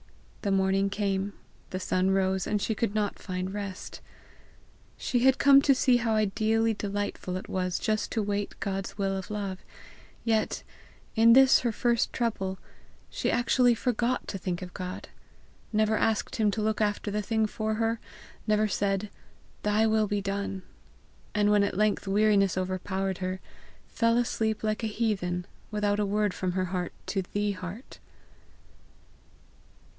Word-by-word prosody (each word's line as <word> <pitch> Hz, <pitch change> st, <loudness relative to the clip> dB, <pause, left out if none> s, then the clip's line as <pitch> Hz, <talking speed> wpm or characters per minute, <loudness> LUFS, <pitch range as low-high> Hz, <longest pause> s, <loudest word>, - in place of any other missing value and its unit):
The 205 Hz, -, -1 dB
morning 195 Hz, 0 st, +2 dB
came, 200 Hz, 0 st, -1 dB, 0.4 s
the 185 Hz, -, -3 dB
sun 185 Hz, 0 st, +1 dB
rose, 190 Hz, -1 st, +1 dB
and 210 Hz, -, +1 dB
she 220 Hz, -, 0 dB
could 215 Hz, -1 st, -1 dB
not 210 Hz, -2 st, -1 dB
find 185 Hz, 0 st, -4 dB
rest. 200 Hz, -2 st, -6 dB, 1.0 s
She 245 Hz, -, 0 dB
had 265 Hz, +2 st, +5 dB
come 275 Hz, 0 st, +7 dB
to 275 Hz, -1 st, +4 dB
see 250 Hz, -1 st, +4 dB
how 225 Hz, -2 st, 0 dB
ideally 220 Hz, +2 st, +2 dB
delightful 205 Hz, -3 st, -3 dB
it 185 Hz, -, -8 dB
was 180 Hz, -1 st, -1 dB
just 215 Hz, 0 st, -1 dB
to 220 Hz, -, 0 dB
wait 205 Hz, 0 st, -3 dB
God's 195 Hz, 0 st, -3 dB
will 195 Hz, -1 st, 0 dB
of 190 Hz, -1 st, -5 dB
love, 200 Hz, -3 st, -3 dB, 0.6 s
yet, 220 Hz, -2 st, 0 dB, 0.5 s
in 230 Hz, +1 st, +7 dB
this 265 Hz, +1 st, +7 dB
her 240 Hz, -, 0 dB
first 235 Hz, +1 st, +1 dB
trouble, 195 Hz, -6 st, -2 dB, 0.5 s
she -, -, -1 dB
actually 245 Hz, 0 st, +3 dB
forgot 245 Hz, +2 st, 0 dB
to 195 Hz, -, -4 dB
think 180 Hz, 0 st, -3 dB
of 180 Hz, -, -9 dB
God, 180 Hz, -1 st, -6 dB, 0.6 s
never 215 Hz, 0 st, +2 dB
asked 220 Hz, 0 st, 0 dB
him 215 Hz, -2 st, +3 dB
to 215 Hz, +2 st, -2 dB
look 220 Hz, 0 st, 0 dB
after 205 Hz, 0 st, 0 dB
the 210 Hz, +1 st, -1 dB
thing 220 Hz, +1 st, +1 dB
for 215 Hz, 0 st, -2 dB
her, 225 Hz, +1 st, 0 dB, 0.5 s
never 215 Hz, 0 st, +3 dB
said, 200 Hz, 0 st, -1 dB, 0.5 s
"Thy 210 Hz, +1 st, +2 dB
will 220 Hz, -1 st, +2 dB
be 205 Hz, 0 st, -1 dB
done!" 195 Hz, -1 st, -3 dB, 0.7 s
And 210 Hz, 0 st, +3 dB
when 210 Hz, -1 st, +5 dB
at 200 Hz, -2 st, -1 dB
length 210 Hz, -1 st, +1 dB
weariness 200 Hz, -2 st, +3 dB
overpowered 190 Hz, +1 st, -2 dB
her, 185 Hz, 0 st, -3 dB, 0.5 s
fell 230 Hz, 0 st, +2 dB
asleep 220 Hz, -3 st, 0 dB
like 215 Hz, +1 st, -1 dB
a -, -, +1 dB
heathen, 195 Hz, -5 st, -1 dB, 0.2 s
without 210 Hz, -1 st, 0 dB
a 210 Hz, -, +2 dB
word 210 Hz, -1 st, +1 dB
from 185 Hz, -1 st, -2 dB
her 185 Hz, 0 st, 0 dB
heart 180 Hz, -1 st, -3 dB
to 195 Hz, -, -1 dB
the 205 Hz, +3 st, -1 dB
heart. 185 Hz, +5 st, -8 dB
205 Hz, 160 wpm, -28 LUFS, 195-220 Hz, 1.0 s, come